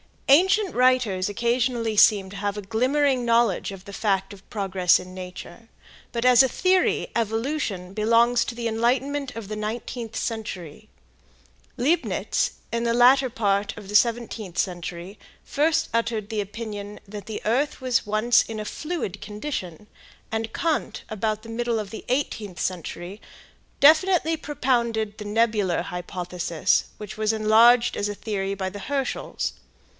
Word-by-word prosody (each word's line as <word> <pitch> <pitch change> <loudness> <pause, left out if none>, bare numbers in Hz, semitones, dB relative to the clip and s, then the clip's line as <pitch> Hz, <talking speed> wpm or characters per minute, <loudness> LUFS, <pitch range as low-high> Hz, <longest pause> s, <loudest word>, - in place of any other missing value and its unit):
Ancient 380 +7 +5
writers 250 -7 +2
occasionally 235 0 0
seemed 195 -2 +5
to 200 - -8
have 205 0 -2
a - - -3
glimmering 255 +5 +1
knowledge 230 -5 +2
of 190 -1 -11
the 200 0 -11
fact 195 -2 0
of 195 -1 -16
progress 190 -4 +2
in 185 0 -10
nature, 185 +4 -9 0.4
but 235 -1 -2
as 250 -1 +7
a 265 - +4
theory 370 +7 +1
"evolution" 225 -4 -2
belongs 230 +3 +3
to 235 - -5
the 235 -1 -2
enlightenment 255 +5 0
of 225 -3 -6
the 215 +1 -5
nineteenth 225 +1 -5
century. 215 -4 -5 0.9
Leibnitz, 290 +8 0 0.2
in 235 0 -1
the 235 0 +1
latter 255 +2 +5
part 205 -1 0
of 205 -2 -10
the - - -6
seventeenth 225 -5 +1
century 180 +1 -4 0.2
first 320 +3 +1
uttered 230 -2 -1
the 220 -2 -1
opinion 205 0 -7
that 205 0 -8
the 220 - -6
earth 260 +7 0
was 255 -2 +1
once 215 +3 +4
in 220 -1 -6
a 210 - -4
fluid 305 - -4
condition 210 - -6 0.5
and 225 0 -3
Kant 325 -2 -1
about 215 0 -2
the 230 - -11
middle 235 0 -1
of 210 -2 -4
the 220 - -8
eighteenth 220 - -2
century, 180 +3 -4 0.6
definitely 325 +2 +5
propounded 235 -7 -1
the 210 - -6
nebular 210 -4 +1
hypothesis, 180 -2 -1
which 210 0 -8
was 215 0 +1
enlarged 225 +3 +5
as 205 - 0
a 205 - -4
theory 200 -2 -3
by 190 -1 -3
the 205 +2 -8
Herschels. 275 +5 -3
220 Hz, 150 wpm, -24 LUFS, 200-245 Hz, 0.9 s, as